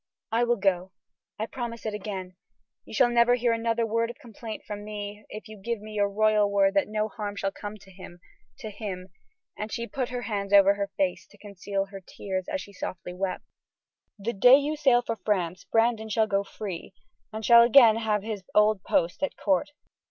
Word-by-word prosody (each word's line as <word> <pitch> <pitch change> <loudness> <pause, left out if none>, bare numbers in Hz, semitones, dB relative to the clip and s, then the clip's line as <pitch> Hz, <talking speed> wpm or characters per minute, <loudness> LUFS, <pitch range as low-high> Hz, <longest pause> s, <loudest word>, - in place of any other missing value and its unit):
"I 235 +2 +2
will 240 0 +2
go; 190 -2 0 0.4
I 220 - -2
promise 235 -1 -6
it 215 - -2
again. 190 -3 -6 0.5
You - - -12
shall 240 +1 +4
never 240 +1 +5
hear 240 -1 +1
another 230 0 0
word 230 +1 0
of 240 - -8
complaint 225 -1 -9
from 205 0 -6
me 210 0 -7
if 215 - -8
you 215 -1 -11
give 235 +2 -2
me 215 +1 -10
your 205 -1 +1
royal 210 0 +3
word 195 -1 +3
that 195 - +2
no 215 0 -1
harm 210 -2 -6
shall 195 -1 -2
come 205 +1 -8
to 195 -1 -17
him 180 -2 -12 0.4
to 215 - -7
him," 195 -3 -6 0.5
and 210 +1 -5
she 235 -2 -3
put 260 -1 -3
her 245 -1 -4
hands 200 -3 -3
over 200 0 +7
her 200 -1 -3
face 185 -2 -1
to 205 - -20
conceal 200 -1 -4
her 195 0 -10
tears 185 0 -5
as 290 - -2
she 200 - -12
softly 180 -1 -6
wept. 185 +1 -3 0.7
"The 215 +4 -3
day 245 +6 +7
you 290 +2 -1
sail 265 -5 +3
for 230 -1 -3
France, 185 -4 -2
Brandon 225 -1 +1
shall 220 +1 +2
go 200 -2 0
free 195 -3 -7 0.4
and 220 0 -5
shall 235 -1 +8
again 235 -2 +7
have 215 -3 0
his 215 -2 -4
old 210 -1 +4
post 170 +1 0
at 285 - -2
court. 190 +2 +1
210 Hz, 205 wpm, -27 LUFS, 195-230 Hz, 0.7 s, shall